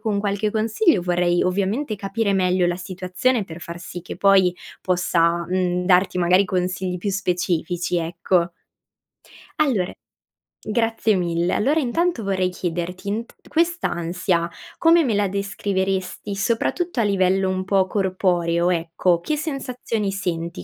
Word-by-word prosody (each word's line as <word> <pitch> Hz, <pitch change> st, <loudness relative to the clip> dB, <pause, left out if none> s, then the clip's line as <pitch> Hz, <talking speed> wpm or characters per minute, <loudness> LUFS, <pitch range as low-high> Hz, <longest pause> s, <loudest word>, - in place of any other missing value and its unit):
con 215 Hz, -3 st, -1 dB
qualche 205 Hz, +1 st, 0 dB
consiglio, 220 Hz, -, +2 dB
vorrei 175 Hz, 0 st, +1 dB
ovviamente, 200 Hz, +7 st, 0 dB
capire 200 Hz, +1 st, -1 dB
meglio 185 Hz, -1 st, +2 dB
la 175 Hz, -, +1 dB
situazione 185 Hz, +5 st, -1 dB
per 165 Hz, -2 st, -10 dB
far 170 Hz, 0 st, -7 dB
sì 175 Hz, 0 st, -8 dB
che -, -, -5 dB
poi, 190 Hz, -3 st, +4 dB, 0.3 s
possa, 170 Hz, -2 st, +1 dB
mhmm, 180 Hz, -1 st, 0 dB
darti 185 Hz, 0 st, +3 dB
magari 180 Hz, +2 st, +4 dB
consigli 180 Hz, 0 st, -1 dB
più 200 Hz, +3 st, -2 dB
specifici 180 Hz, -2 st, -1 dB
ecco. 170 Hz, +1 st, 0 dB, 1.1 s
Allora, 225 Hz, -12 st, +1 dB, 0.7 s
grazie 225 Hz, 0 st, 0 dB
mille! 175 Hz, -1 st, 0 dB
Allora 285 Hz, +9 st, +2 dB
intanto, 305 Hz, -1 st, 0 dB
vorrei 185 Hz, -2 st, 0 dB
chiederti, 180 Hz, +1 st, -4 dB
int 225 Hz, +3 st, -4 dB
quest'ansia, 180 Hz, -, 0 dB, 0.3 s
come 335 Hz, 0 st, +5 dB
me 245 Hz, -6 st, 0 dB
la 205 Hz, 0 st, +2 dB
descriveresti, 195 Hz, 0 st, -2 dB
soprattutto 240 Hz, -, -1 dB
a -, -, +3 dB
livello 190 Hz, -1 st, +2 dB
un 185 Hz, 0 st, -1 dB
po' 195 Hz, 0 st, +2 dB
corporeo 180 Hz, -3 st, +1 dB
ecco, 170 Hz, +1 st, +1 dB
che 300 Hz, -, -2 dB
sensazioni 250 Hz, -8 st, -3 dB
senti 170 Hz, -, -3 dB
190 Hz, 130 wpm, -22 LUFS, 180-210 Hz, 1.1 s, come